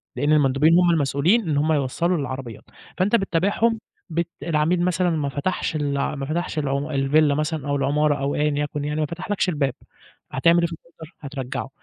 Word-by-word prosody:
لإن 145 +4 0
المندوبين 145 +2 +4
هُم 175 -1 +4
المسؤولين 165 - +2
إن 145 - +1
هُم 155 +2 +2
يوّصلوا 155 +5 0
للعربيات، 130 -5 -5 0.3
فأنت 195 +5 +2
بتتابعهم 205 +3 +1 0.3
بت 170 +1 -1 0.2
العميل 165 +2 +1
مثلًا 180 0 +1
ما 155 -4 -1
فتحش 155 +4 -2
الع 145 -1 -1
ما 140 -1 -4
فتحش 160 +2 -2
العم 140 0 -2
الفيلا 145 +1 +2
مثلًا 155 -1 -2
أو 140 - +1
العمارة 145 +2 +2
أو 140 0 -2
أيًا 150 0 +1
يكن 145 0 -4
يعني 150 +1 -2
ما 155 - +1
فتحلكش 185 +5 -2
الباب، 145 -6 0 0.6
هتعمل 170 +6 +4
إيه 170 - +2
في 170 - -8
الOrder؟ 165 -1 -15
هترجّعه، 135 -2 -5
150 Hz, 180 wpm, -23 LUFS, 140-170 Hz, 0.6 s, المندوبين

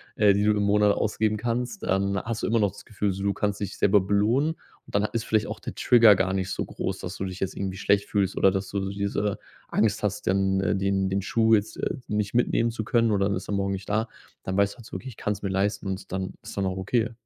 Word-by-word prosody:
äh, 105 -2 +5
die 100 +1 +1
du 105 - +4
im 105 -1 +1
Monat 105 0 +4
ausgeben 110 0 0
kannst. 120 - -3
Dann 100 0 0
hast 115 -1 -4
du - - +1
immer 115 0 +2
noch 100 -2 +2
das - - -13
Gefühl 105 -2 -2
so, 95 +1 -5
du 100 - +2
kannst 105 0 -2
dich 100 - -4
selber 100 0 +4
belohnen 105 +10 +2
und 160 - -17
dann 100 - +3
ha - - -2
ist 115 -1 -1
vielleicht 110 -1 +1
auch - - -6
der - - -6
Trigger 115 -5 +6
gar 95 +1 +1
nicht 95 0 -1
so - - -2
groß, 95 0 -4
dass 95 0 -6
du - - -4
dich 95 -1 -5
jetzt 95 - -2
irgendwie 95 -1 -4
schlecht 100 +1 +1
fühlst 100 -2 0
oder 95 - +5
dass 95 0 -2
du 100 - -2
so 95 - -3
diese 100 0 -1 0.3
Angst 105 -1 +1
hast, 105 0 -2
ähm, 95 0 +2 0.2
den 95 0 +1
den 95 +1 0
Schuh 110 +3 +3
jetzt, 105 0 -2
äh, - - -2
nicht 105 -1 -1
mitnehmen 115 -1 +2
zu 115 -1 -4
können 115 0 +2
oder 100 -1 +2
dann 100 - 0
ist 95 - -8
er - - -3
morgen 100 0 0
nicht 95 0 -5
da. 110 +2 0 0.3
Dann 95 0 -3
weißt 100 0 +3
du - - -21
halt 115 - -12
so - - -14
wirklich: 130 - -6
„Ich - - -27
kann's 105 -1 -2
mir 100 - -2
leisten.", 100 +1 -1
und 95 -1 -5
dann 95 -1 -3
ist - - -9
dann 100 - 0
auch 95 -1 -1
okay. 110 +4 0
100 Hz, 275 wpm, -26 LUFS, 95-110 Hz, 0.3 s, Trigger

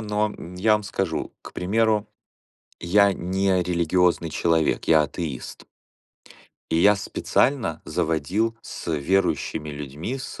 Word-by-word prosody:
но 105 0 -1 0.2
я 110 +4 +3
вам 105 0 +2
скажу, - - -3
к - - -11
примеру, 105 +2 +1 0.7
я 100 +3 +4
не 95 +1 0
религиозный 85 -1 +1
человек. 80 -1 +1
Я 80 -2 +5
атеист. 75 -3 -6 1.1
И 80 - +2
я 100 +3 +6
специально 110 - 0
заводил 90 +8 -1
с 85 - -6
верующими 80 0 0
людьми, 75 - -5
с 135 - -8
90 Hz, 115 wpm, -24 LUFS, 80-105 Hz, 1.1 s, я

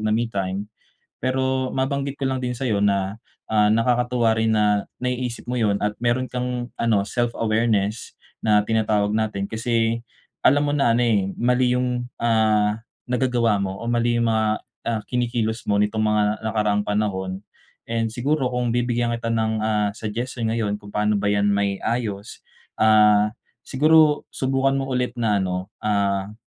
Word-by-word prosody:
na 110 0 +1
me 115 0 -1
time. 100 +1 -3 0.5
Pero 130 0 0
mabanggit 140 +1 -2
ko 135 - 0
lang 130 - -1
din 125 - -1
sa'yo 115 -5 -1
na, 100 -1 +1 0.3
ah, 105 -1 +3
nakakatuwa 120 0 +2
rin 110 0 +1
na 105 -2 +2 0.2
naiisip 125 -1 -3
mo 125 - -2
yun 105 -4 +1
at 105 0 -1
meron 125 +2 +1
kang 125 -1 -3
ano, 105 -4 +1
self-awareness 115 -3 0 0.3
na 105 -1 +4
tinatawag 105 -2 +1
natin, 105 -3 -1
kasi 115 0 -1 0.4
alam 145 +2 +4
mo 145 - 0
na 140 -5 +2
ano, 120 - +2
eh, 105 -5 +2
mali 125 +1 +2
yung, 125 -1 -1 0.2
ah, 110 -2 +2 0.3
nagagawa 125 -3 +1
mo 95 -1 -2
o 115 - -3
mali 120 0 +1
yung 115 - +2
mga, 110 -1 +2 0.4
ah, 115 -2 -1
kinikilos 120 -2 -1
mo 100 0 +2
nitong 105 +1 0
mga 105 0 +2 0.2
nakaraang 105 -2 0
panahon. 95 -2 -2 0.5
And 115 0 0
siguro 135 +3 0
kung 125 -1 0
bibigyan 120 0 0
kita 115 - -5
ng, 110 -1 0
ah, 105 -1 +1
suggestion 115 +2 -3
ngayon 105 -3 -1
kung 105 - -14
paano 105 0 +1
ba 100 - -1
yan 100 0 +2
mai-ayos, 100 +1 -2 0.4
ah, 105 -1 +5 0.3
siguro 155 +2 +4
subukan 135 +1 0
mo 135 0 -2
ulit 125 0 0
na 110 -3 +2
ano, 90 0 -3 0.2
ah, 100 -1 0
115 Hz, 155 wpm, -23 LUFS, 105-125 Hz, 0.5 s, ah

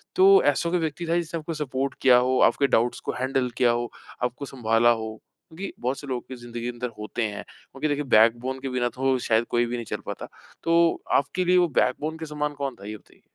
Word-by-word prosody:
तो 390 +2 +7
ऐसा 170 - -1
कोई 180 +1 +1
व्यक्ति 160 +1 -3
था 170 - +2
जिसने 170 -1 -2
आपको 160 +1 -5
सपोर्ट 135 -3 -2
किया 125 -2 +7
हो, 125 +1 +2
आपके 140 - +4
डाउट्स 120 -1 +1
को - - -4
हैंडल 130 0 0
किया 125 -2 +4
हो, 120 0 -2 0.3
आपको 125 +3 -2
सँभाला 120 -3 +2
हो? 110 -2 -1 0.3
क्योंकि 180 +5 -7
बहुत 130 +3 -2
से 145 - -9
लोग 130 0 -4
ज़िंदगी 120 -1 -8
के 120 - -2
अंदर 125 0 -4
होते 105 +2 -3
हैं। 105 -1 -6
क्योंकि 145 +3 -7
देखिए 145 0 -1
बैकबोन 120 +4 +3
के 135 - -4
बिना 125 -1 0
तो 130 +2 0
शायद 115 +1 +3
कोई 120 0 +2
भी 120 - -3
नहीं 120 -1 -5
चल - - -5
पाता। - - -6 0.4
तो 170 0 +3 0.2
आपके 145 +7 -2
लिए 180 +1 +4
वो 175 -1 +4
बैकबोन 155 +5 0
के 160 - -6
समान 150 -1 -3
कौन 135 -2 -2
था 100 - -13
ये 110 - -6
बताइए? - - -25
130 Hz, 230 wpm, -25 LUFS, 120-155 Hz, 0.4 s, तो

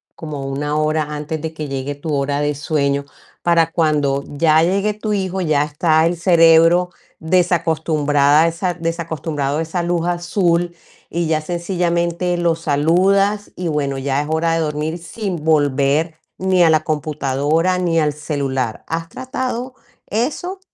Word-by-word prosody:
como 150 -4 -6
1 145 +2 -2
hora 155 0 +1
antes 150 +1 -4
de 160 0 -5
que 155 -1 -5
llegue 135 +1 -4
tu 150 +2 -4
hora 140 0 0
de 145 0 0
sueño 140 -2 0 0.4
para 165 -1 +3
cuando 145 -4 +1
ya 155 +2 +3
llegue 195 +4 +1
tu 215 0 -3
hijo, 190 -1 -2
ya 155 -4 +2
está 155 +2 +2
el 170 - +1
cerebro 165 0 +5 0.3
desacostumbrada 160 -3 +2
esa 170 +2 -1
desacostumbrado 160 -4 -3
a - - 0
esa 170 +2 -3
luz 170 0 -1
azul 175 0 0 0.4
y 170 0 -1
ya 155 -1 +1
sencillamente 175 +1 -1
lo 170 -1 +1
saludas 185 +7 +1
y 180 -1 -3
bueno, 140 -3 -1
ya 135 +1 -1
es 150 - -5
hora 160 +1 +1
de - - 0
dormir 155 +1 -2
sin 175 -1 -5
volver 145 +1 +2 0.2
ni 185 -1 +2
a 165 - +5
la 155 - +4
computadora 150 +3 0
ni 170 -2 +1
al 150 -2 +1
celular. 140 -6 -3
¿Has 165 0 -3
tratado 255 +1 -4 0.3
eso? 310 - -2
160 Hz, 150 wpm, -19 LUFS, 150-175 Hz, 0.4 s, cerebro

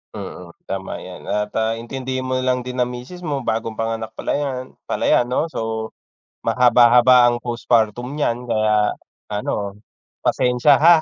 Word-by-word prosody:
Mm, 90 -4 -8
tama 95 0 -5
'yan - - -10
at, 105 0 -1
ah, 110 +1 0
intindihin 130 +2 -4
mo 130 0 -1
na - - -3
lang 125 -1 +1
din 125 0 -5
ang 125 - +2
misis 125 +9 -8
mo, 145 -6 -3
bagong 115 -1 -2
panganak 115 0 -3
pala - - -3
'yan 130 -3 -4 0.2
pala - - -2
'yan 120 - +3
'no. 155 +6 -1
So, 110 0 -3 0.5
mahaba-haba 125 0 +6
ang 120 0 -1
postpartum 120 +1 0
niyan 125 -4 -1
kaya 110 -2 +2 0.4
ano, 105 0 -3 0.4
pasensiya, 125 +3 +3
ha. 170 +3 +7
120 Hz, 160 wpm, -21 LUFS, 110-130 Hz, 0.5 s, ha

